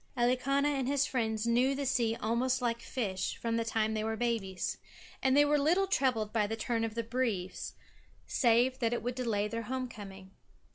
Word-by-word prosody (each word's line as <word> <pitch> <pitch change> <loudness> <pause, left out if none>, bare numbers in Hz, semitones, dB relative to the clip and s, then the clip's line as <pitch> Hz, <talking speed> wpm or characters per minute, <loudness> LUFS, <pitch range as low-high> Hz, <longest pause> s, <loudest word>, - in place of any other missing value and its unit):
Elikana 255 +4 +2
and 270 -3 -1
his 280 0 +2
friends 220 -5 -1
knew 245 +4 +3
the 280 0 -2
sea 240 -4 +1
almost 240 +4 0
like 235 -1 -1
fish, 200 -9 -3
from 230 -1 -2
the 230 - +1
time 220 -1 0
they 215 0 -1
were 220 0 -2
babies. 220 -6 -2 0.4
And 265 +1 +3
they 290 - +7
were 295 0 +3
little 345 +7 +3
troubled 255 - +1
by 215 -2 +2
the 225 - -2
turn 230 0 -1
of 225 -1 -3
the 230 - -1
breeze, 225 -6 -2 0.5
save 245 +1 +3
that 230 -1 +1
it 240 - -2
would 245 +1 -1
delay 225 -5 0
their 230 +2 -3
homecoming. 205 -7 -6
235 Hz, 190 wpm, -31 LUFS, 220-260 Hz, 0.5 s, they